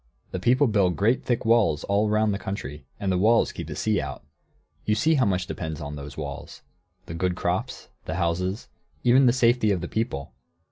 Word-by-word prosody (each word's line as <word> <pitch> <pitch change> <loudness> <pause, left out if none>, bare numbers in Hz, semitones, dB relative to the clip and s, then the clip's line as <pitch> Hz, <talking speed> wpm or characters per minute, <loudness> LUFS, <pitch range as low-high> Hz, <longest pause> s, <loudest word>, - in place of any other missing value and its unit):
The 90 - -3
people 125 +8 +3
build 100 -7 +2
great, 115 +6 +2
thick 120 -3 -1
walls 115 -10 +3
all 100 +2 +1
round 105 0 +2
the 100 - -3
country, 75 -8 -6
and 100 -1 -1
the 90 - +1
walls 115 +4 +4
keep - - -7
the - - -6
sea 110 -2 0
out. 70 -1 -7 0.6
You 105 - +1
see 160 +8 +3
how 135 -5 +3
much 90 -2 0
depends 80 -3 -5
on 75 0 -6
those 70 -2 -9
walls, - - -7 0.4
the - - -7
good 90 +1 -1
crops, - - -2 0.2
the 80 - -3
houses, 90 +4 -1 0.3
and - - -5
even 130 +2 +6
the - - +6
safety 120 -3 +3
of 95 -3 +1
the 85 - -4
people. 70 - -3
100 Hz, 205 wpm, -25 LUFS, 85-115 Hz, 0.6 s, even